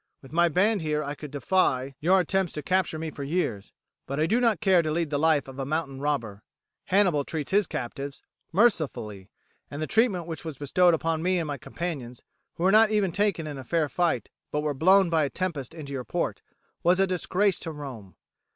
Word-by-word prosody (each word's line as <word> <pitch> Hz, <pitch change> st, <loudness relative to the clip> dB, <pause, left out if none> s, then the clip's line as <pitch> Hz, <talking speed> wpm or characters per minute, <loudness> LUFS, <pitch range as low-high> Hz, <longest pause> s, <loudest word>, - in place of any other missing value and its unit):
With 135 Hz, -, -13 dB
my 170 Hz, +1 st, +4 dB
band 200 Hz, +5 st, +2 dB
here 150 Hz, -1 st, -1 dB
I 145 Hz, 0 st, -4 dB
could 150 Hz, 0 st, -9 dB
defy 140 Hz, -3 st, +1 dB
your 185 Hz, +5 st, +4 dB
attempts 190 Hz, 0 st, 0 dB
to 150 Hz, -, -5 dB
capture 185 Hz, 0 st, +1 dB
me 160 Hz, 0 st, -4 dB
for 140 Hz, -, -7 dB
years, 140 Hz, -, -2 dB, 0.4 s
but 140 Hz, +2 st, -3 dB
I 155 Hz, -, +3 dB
do 225 Hz, +8 st, +2 dB
not 230 Hz, -4 st, +2 dB
care 190 Hz, -5 st, +4 dB
to 155 Hz, -, -3 dB
lead 160 Hz, 0 st, -1 dB
the 145 Hz, -, 0 dB
life 155 Hz, -3 st, +2 dB
of 135 Hz, 0 st, -9 dB
a -, -, -1 dB
mountain 140 Hz, -1 st, -3 dB
robber. 115 Hz, -9 st, -2 dB, 0.4 s
Hannibal 185 Hz, -7 st, +3 dB
treats 150 Hz, 0 st, -4 dB
his 200 Hz, -2 st, +3 dB
captives 135 Hz, +3 st, -5 dB, 0.3 s
mercifully, 155 Hz, -, +1 dB, 0.4 s
and 145 Hz, -, -7 dB
the 155 Hz, -, -1 dB
treatment 210 Hz, -4 st, +2 dB
which 165 Hz, -1 st, -6 dB
was 160 Hz, -5 st, -6 dB
bestowed 170 Hz, +5 st, +3 dB
upon 165 Hz, 0 st, -1 dB
me 185 Hz, +2 st, +1 dB
and 170 Hz, -, -1 dB
my 145 Hz, -2 st, -4 dB
companions, 135 Hz, -7 st, -6 dB, 0.3 s
who 170 Hz, -, -4 dB
were 190 Hz, -, +5 dB
not 220 Hz, +1 st, +6 dB
even 210 Hz, -4 st, +1 dB
taken 200 Hz, -3 st, 0 dB
in 145 Hz, -3 st, -6 dB
fair 165 Hz, +1 st, 0 dB
fight, 165 Hz, -, -1 dB, 0.2 s
but 150 Hz, -, 0 dB
were 150 Hz, -1 st, -1 dB
blown 185 Hz, +5 st, +4 dB
by 160 Hz, -2 st, +3 dB
a 140 Hz, -, 0 dB
tempest 160 Hz, -4 st, -4 dB
into 145 Hz, -4 st, -7 dB
your 130 Hz, -2 st, -3 dB
port, -, -, -2 dB, 0.4 s
was 180 Hz, +2 st, +3 dB
a 195 Hz, -, +5 dB
disgrace 185 Hz, +1 st, +1 dB
to 165 Hz, -, -5 dB
Rome. 130 Hz, -10 st, -9 dB
160 Hz, 210 wpm, -26 LUFS, 140-185 Hz, 0.4 s, not